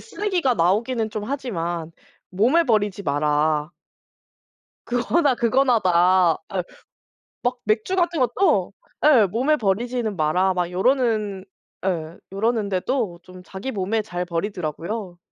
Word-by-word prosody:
'쓰레기가 370 - -1
나오기는 220 +5 +1
좀 210 -1 -4
하지만 175 - -4 0.4
몸을 250 - +3
버리지 205 -4 +1
마라.' 150 0 +1 1.1
"그거나 265 +4 +1
그거나다." 190 -9 +3 0.2
예. 185 - 0 0.8
막 250 +1 0
맥주 215 - 0
같은 345 -3 +1
것도 260 - +2 0.3
예 265 -8 +6
'몸에 255 +11 +1
버리지는 225 +1 -1
마라' 180 +4 +2
막 180 -1 -1
이러는 215 -1 0 0.4
예 165 -3 -2
...이러는데도 205 -1 -1
좀 185 0 -13
자기 190 +8 -6
몸에 210 0 -1
잘 180 -4 -4
버리더라고요. 180 +2 -4
205 Hz, 255 characters per minute, -23 LUFS, 180-245 Hz, 1.1 s, 예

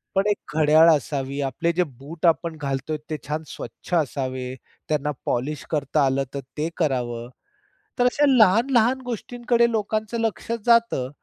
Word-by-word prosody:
पण 195 +2 +2
एक 200 -8 -3
घड्याळ 155 +2 +6
असावी, 140 -2 -3
आपले 140 +5 0
जे 180 - +2
बूट 150 +3 -7
आपण 165 -1 +2
घालतोय 140 +2 -2
ते 155 - -1
छान 155 +2 -2
स्वच्छ - - -9
असावे, 130 -4 -2 0.3
त्यांना 150 -1 0
पॉलिश 140 +5 -2
करता 145 -1 +1
आलं 135 +1 +1
तर 140 - -3 0.2
ते 155 +2 -1
करावं. 120 -6 -1 0.7
तर 245 - +4
अशा 285 +4 +3
लहान-लहान 240 +1 +4
गोष्टींकडे 240 0 0
लोकांचं 220 +1 -1
लक्ष 225 0 -2
जातं, 230 - +3
155 Hz, 145 wpm, -23 LUFS, 140-220 Hz, 0.7 s, घड्याळ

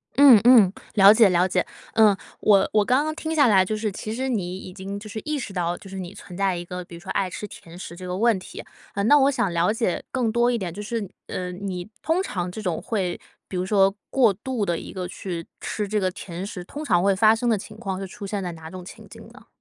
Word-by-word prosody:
嗯 270 -5 +9
嗯， 230 -7 +7 0.2
了 200 0 +8
解 220 -2 +6
了 180 0 +3
解。 180 -1 0 0.3
嗯， 215 -3 +5 0.2
我 200 -2 +4
我 210 -1 +4
刚 255 +7 +2
刚 310 - -2
听 320 0 -4
下 290 -4 +5
来 195 -4 +5
就 215 +3 -2
是 215 -1 -2
其 215 +3 -5
实 260 +3 -2
你 185 -7 -2
已 185 -1 -9
经， 195 +1 -6
就 215 - -10
是 220 - -5
意 305 -1 -1
识 210 -7 -6
到， 175 -1 -1
就 195 - -13
是 195 - -7
你 180 +1 -7
存 180 - -11
在 195 -1 +1
一 175 0 -5
个 180 0 -6
比 170 - -11
如 170 - -10
说 190 - -7
爱 190 - 0
吃 210 +4 -6
甜 170 -3 -13
食 170 - -8
这 180 +1 -8
个 180 - -3
问 225 -1 +3
题。 - - -9 0.3
嗯， 200 +1 0
那 295 - +7
我 275 +1 +4
想 200 -8 0
了 170 +4 +2
解 225 -5 -1
更 240 -4 0
多 235 +1 +3
一 240 - 0
点， 185 -6 -4
就 205 - -6
是， 215 -1 -3 0.2
呃， 180 0 -4
你 180 -1 -5
通 335 +4 +1
常 180 - -3
这 215 - -7
种 180 -6 -2
会 190 -6 -2 0.3
比 - - -7
如 180 0 -1
说 195 -1 +3
过 240 -6 +4
度 215 +2 -3
地 170 -2 0
一 - - -8
个 185 -2 -4
去 175 -3 -6 0.2
吃 210 -2 -3
这 210 +1 0
个 185 -1 +1
甜 180 -1 -7
食， 185 -3 -7
通 290 +11 -7
常 180 - +2
会 195 -1 +3
发 215 +3 +5
生 240 +2 -2
的 220 - +3
情 215 +1 -10
况 195 -4 -4
是 195 - -5
出 200 - -9
现 200 -1 -3
在 175 - -4
哪 160 0 -10
种 185 -1 -8
情 180 - -12
景 - - -12
呢？ - - -17
195 Hz, 290 characters per minute, -24 LUFS, 180-225 Hz, 0.3 s, 嗯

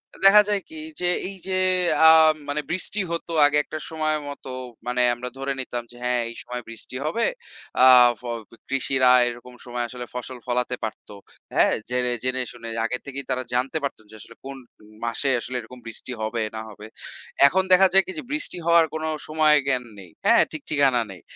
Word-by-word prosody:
এ - - -15
দেখা 210 +2 +9
যায় 205 -1 +1
কি 320 - -10 0.2
যে, 175 - +2 0.2
এই 195 - -9
যে 185 -1 0 0.5
আ - - +10 0.4
মানে 150 +1 -1
বৃষ্টি 185 +3 -1
হতো 170 0 -4
আগে 145 0 +3
একটা 155 - -7
সময় 155 -1 -1
মতো, 140 -1 -9 0.4
মানে 125 0 0
আমরা 125 +1 -6
ধরে 135 0 -2
নিতাম 120 -2 -5
যে 120 - -14
হ্যাঁ, 125 -1 +1
এই 115 - -10
সময় 125 0 -6
বৃষ্টি 115 +2 -9
হবে। 230 +10 0 0.6
আ - - +9 0.3
ফগ 120 -1 -4 0.3
কৃষিরা 135 -1 +3 0.2
এরকম 120 +1 -7
সময় 120 -1 -3
আসলে 125 -1 -7
ফসল 125 +1 -5
ফলাতে 125 0 -1
পারত। 110 - -5 0.5
হ্যাঁ? - - +4 0.2
যেরে 125 0 0
জেনে 130 0 0
শুনে 115 -1 -9 0.2
আগে 125 - -2
থেকেই 140 -1 -6
তারা 130 0 -1
জানতে 130 +5 0
পারতো 140 -5 -4
যে - - -12
আসলে 115 - -13
কোনো 135 -1 -8 0.4
মাসে 115 +4 -1
আসলে 125 +2 -6
এরকম 125 +3 -13
বৃষ্টি 115 +3 -7
হবে, 110 +1 -2
না - - -4
হবে। 105 0 -12 0.6
এখন 190 +6 +2
দেখা 190 +1 +7
যায় 195 0 +6
কি, - - -4
যে - - -7
বৃষ্টি 300 -10 -1
হওয়ার 170 -1 +6
কোনো 160 0 -3 0.2
সময় 155 -1 +4
জ্ঞান 130 -2 +1 0.2
নেই। 95 -3 -12 0.2
হ্যাঁ? - - +6
ঠিক 155 - -6
ঠিকানা 135 -5 +3
নেই। 90 -3 -12
130 Hz, 190 wpm, -24 LUFS, 120-155 Hz, 0.6 s, আ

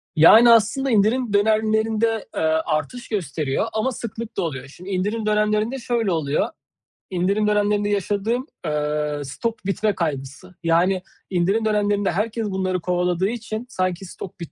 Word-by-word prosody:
Yani 220 +10 +8
aslında 230 +4 +3
indirim 220 +2 +2
dönemlerinde, 220 +1 +2
aaa, 160 0 +1
artış 240 +11 -2
gösteriyor 155 - -1
ama 220 +5 0
sıklıkla 230 -2 -5
oluyor. 140 -7 -4
Şimdi 180 +7 -11
indirim 205 +4 -1
dönemlerinde 215 +4 +1
şöyle 230 -4 0
oluyor; 150 -4 0 0.6
indirim 195 +4 +1
dönemlerinde 205 0 +2
yaşadığım, 205 +5 -1 0.2
aaa, 150 -1 -1
stok 220 - -4
bitme 205 +1 0
kaygısı 155 +2 -4
yani 175 +3 +2 0.3
indirim 195 +5 +1
dönemlerinde 205 -1 +1
herkes 220 +5 -1
bunları 185 -1 -1
kovaladığı 180 +1 0
için 225 0 -5
sanki 185 -3 -2
stok 180 +1 -9
bit 170 -4 -7
205 Hz, 130 wpm, -22 LUFS, 175-220 Hz, 0.6 s, Yani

